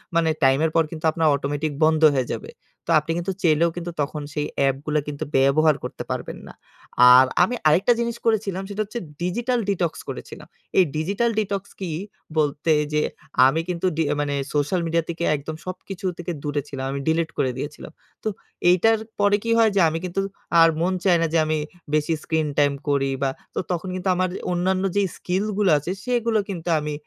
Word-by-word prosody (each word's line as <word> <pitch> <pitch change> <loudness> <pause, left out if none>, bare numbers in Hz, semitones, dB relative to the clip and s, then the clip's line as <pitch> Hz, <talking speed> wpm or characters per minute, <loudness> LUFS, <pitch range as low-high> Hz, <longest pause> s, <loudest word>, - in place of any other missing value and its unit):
মানে 165 -1 +3
টাইমের 135 +4 +3
পর 165 - +5
কিন্তু 160 -1 -6
আপনার 160 0 +1
অটোমেটিক 145 +2 -2
বন্ধ 155 0 +3
হয়ে 130 -2 0
যাবে। - - -7 0.4
তো - - -12
আপনি 155 +2 -5
কিন্তু 175 +2 -2
চাইলেও 165 0 +4
কিন্তু 175 0 -5
তখন 145 +1 -3
সেই 150 -1 -1
অ্যাপগুলো 140 +3 +1
কিন্তু 145 -1 -4
ব্যবহার 150 +3 +4
করতে - - -5
পারবেন - - -4
না। - - -11 0.6
আর 130 +1 +8 0.2
আমি 240 +7 0
আরেকটা 180 +10 +4
জিনিস 235 -1 -1
করেছিলাম। 205 -4 0
সেটা 205 +1 -3
হচ্ছে 235 +4 -5 0.2
digital 240 +7 0
detox 175 -4 0 0.2
করেছিলাম। - - -8 0.3
এই 190 - +8
ডিজিটাল 200 +9 0
ডিটক্স 200 -2 -3
কি? 185 -4 -4 0.5
বলতে 150 +1 +2 0.2
যে 150 - +2 0.5
আমি 160 +4 +1
কিন্তু 175 +1 -2
ডি 165 - +2 0.2
মানে 145 -1 -1 0.2
সোশ্যাল 145 +5 +1
মিডিয়া 165 0 +1
থেকে 170 0 -3
একদম 150 +2 -6
সবকিছু 185 +1 -7
থেকে 175 0 -4
দূরে 145 -1 -1
ছিলাম। 135 -1 -5
আমি 140 - -3
ডিলিট 160 0 +1
করে 130 - +1
দিয়েছিলাম। 150 +2 -7 0.3
তো - - -2 0.4
এইটার 225 +5 +4 0.2
পরে 205 0 +4
কি 230 - -1
হয়? 225 -1 +5
যে 195 - +4
আমি 165 +1 -3
কিন্তু 180 +2 -2 0.4
আর 165 - +7
মন 185 +2 +1
চায় 175 -3 +4
না 165 - +2
যে - - +4
আমি 155 0 0 0.4
বেশি 155 +2 +2
স্ক্রিন 160 -1 0
টাইম 145 -1 +4 0.2
করি। 135 -1 +1
বা 135 - +2 0.3
তো - - 0
তখন 180 +2 -2
কিন্তু 185 +1 -2
আমার 185 +1 +1 0.2
অন্যান্য 185 +2 0
যে 205 - +3 0.2
স্কিলগুলো 200 +1 0
আছে 150 +5 -4
সেগুলো 235 -3 +1
কিন্তু 175 -2 -4
আমি 150 0 -4
165 Hz, 185 wpm, -23 LUFS, 150-190 Hz, 0.6 s, আর